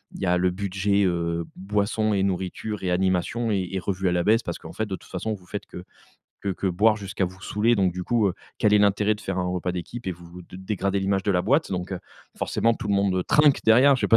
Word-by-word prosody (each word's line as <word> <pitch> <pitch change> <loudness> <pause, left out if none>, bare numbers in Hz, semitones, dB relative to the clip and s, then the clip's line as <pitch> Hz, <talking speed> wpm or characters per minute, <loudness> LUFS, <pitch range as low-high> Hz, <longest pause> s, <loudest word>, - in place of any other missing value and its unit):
il - - -8
y - - 0
a 90 0 +3
le 90 0 +2
budget, 100 +1 0
heu, 85 -1 0
boissons 105 +2 0
et 95 -1 +1
nourritures 95 +3 -3
et 90 - 0
animations 95 +5 0
est 95 -3 0
est 95 - 0
revus 95 0 -2
à - - +2
la 85 0 +1
baisse 115 +3 +4
parce - - -4
qu'en - - -10
fait: 110 - -2
«De 95 - -3
toute - - -16
façon, 105 +4 -3
heu, - - -3
vous 90 -2 -16
faites 105 - -6
que 90 - -9 0.6
que 100 - -4
que 95 +1 -3
boire 105 +5 +3
jusqu'à 100 -1 -2
vous 95 +2 -7
saouler, 110 +4 +1
donc 95 -3 +2
du 90 0 -4
coup, 115 -4 +2
heu, 90 - -3 0.2
quel 105 -2 +3
est - - +6
l'intérêt 105 +1 +3
de - - -14
faire 95 -3 -3
un 90 - 0
repas 90 0 -2
d'équipe 95 +6 -6
et - - -1
vous 85 +1 -12
de 90 - -12
dégrader 100 0 -1
l'image 95 0 0
de 105 - +2
la 90 -1 +2
boîte?» 140 - +2
donc, 90 +1 -3
heu, 90 - -3 0.4
forcément, 115 0 +1
tout - - -6
le 100 - +2
monde, 100 -1 +2
heu, 90 - +1
trinque 150 -2 +4
derrière, 130 +5 +6
je - - -6
sais - - +1
pas 115 - +7
95 Hz, 275 wpm, -25 LUFS, 90-105 Hz, 0.6 s, pas